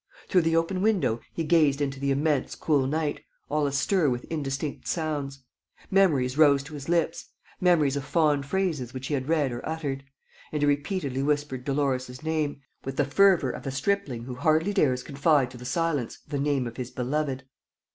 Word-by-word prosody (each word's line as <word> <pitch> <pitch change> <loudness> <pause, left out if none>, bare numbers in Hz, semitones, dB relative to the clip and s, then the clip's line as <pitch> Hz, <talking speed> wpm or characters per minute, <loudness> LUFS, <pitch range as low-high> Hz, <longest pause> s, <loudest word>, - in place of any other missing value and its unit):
Through 185 - +4
the 165 0 +1
open 165 +3 +1
window, 195 - +2
he 165 - -3
gazed 150 -3 +3
into 140 -2 -2
the 140 0 -1
immense, 140 0 +1
cool 140 -4 +1
night, 155 +1 -1 0.3
all 150 -1 +1
astir 145 +4 +2
with 125 -1 -2
indistinct 140 -1 -3
sounds. 145 -5 -3 0.5
Memories 150 -9 +3
rose 140 -3 +6
to 145 - -11
his 145 +1 -7
lips, 170 -1 +1 0.3
memories 160 -6 +3
of 140 - -2
fond 145 -1 +1
phrases 160 -9 -1
which 130 +1 -5
he - - -1
had 135 0 -2
read 150 -5 +2
or 120 - -5
uttered; 145 -4 -3 0.5
and 150 -1 -1
he - - +5
repeatedly 145 -2 -1
whispered 145 -3 -1
Dolores's 135 -2 -1
name, 155 -3 -1 0.2
with 135 0 -5
the 145 - +3
fervor 175 -2 +4
of - - -8
a - - -1
stripling 140 -5 -1
who 125 +1 -6
hardly 160 +8 +2
dares 130 -10 +2
confide 140 -2 +2
to 125 - -10
the 125 - -9
silence 145 -3 -1
the 145 -2 -3
name 140 -2 +1
of 120 -1 -7
his 125 -2 -4
beloved. 135 +1 -2
145 Hz, 185 wpm, -27 LUFS, 135-160 Hz, 0.5 s, rose